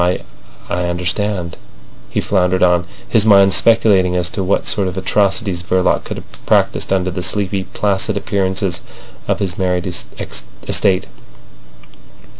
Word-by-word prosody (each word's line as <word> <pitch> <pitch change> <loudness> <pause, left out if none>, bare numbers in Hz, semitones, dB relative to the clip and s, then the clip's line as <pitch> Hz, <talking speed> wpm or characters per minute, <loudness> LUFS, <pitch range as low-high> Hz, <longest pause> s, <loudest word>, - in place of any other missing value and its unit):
I—I 90 0 -4
understand," 90 +1 -2 0.5
he - - -1
floundered 90 -1 +1
on, 90 -1 +3 0.2
his 110 -3 +3
mind 100 -3 +6
speculating 100 -4 +4
as 90 0 0
to 95 - -2
what 95 - 0
sort 100 -2 +1
of 90 0 -5
atrocities 100 -1 0
Verloc 90 0 +1
could - - -5
have - - -12
practised - - +2
under 95 -1 +1
the 90 - -4
sleepy, 95 +1 -1
placid 100 -1 0
appearances 95 -3 -1 0.5
of - - +1
his 95 -1 -2
married 90 -2 0 0.8
estate. 95 -1 +2
95 Hz, 130 wpm, -17 LUFS, 90-100 Hz, 0.8 s, mind